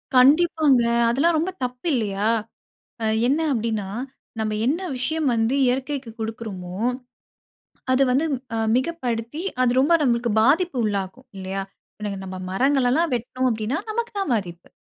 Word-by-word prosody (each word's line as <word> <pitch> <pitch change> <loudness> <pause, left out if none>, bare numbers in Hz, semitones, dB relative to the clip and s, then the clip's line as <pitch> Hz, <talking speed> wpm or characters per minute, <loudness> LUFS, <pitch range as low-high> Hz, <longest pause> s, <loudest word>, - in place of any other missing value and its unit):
கண்டிப்பாங்க. 290 -1 +5 0.3
அதெல்லாம் 315 +7 +2
ரொம்ப 335 +4 0
தப்பு 250 +5 -4
இல்லையா? 210 -4 0 0.8
அ - - +1 0.2
என்ன 280 +5 +2
அப்படீன்னா, 220 -4 -1 0.5
நம்ம 215 -1 -1
என்ன 295 +7 +1 0.2
விஷயம் 310 +4 -1
வந்து 230 +3 +1
இயற்கைக்கு 265 0 -1
கொடுக்குறோமோ, 215 -5 -5 1.2
அது 260 +1 +4
வந்து 265 +5 +2 0.3
அ - - -1 0.2
மிகப்படுத்தி 255 -1 -2 0.2
அது 250 - +4
ரொம்ப 290 +6 +3
நம்பளுக்கு 240 -3 +1
பாதிப்பு 305 +5 +3
உள்ளாக்கும், 205 +4 -3
இல்லையா? 190 +1 -3 0.4
இன்னைக்கு 205 -2 -3
நம்ம 185 0 -6
மரங்களல்லாம் 270 - +2
வெட்டுனோம் 255 +2 -1
அப்படீன்னா, 225 +5 -1
நமக்கு 470 +2 -2
தான் 385 -10 0
பாதிப்பு. 175 -5 -4
250 Hz, 130 wpm, -23 LUFS, 220-285 Hz, 1.2 s, கண்டிப்பாங்க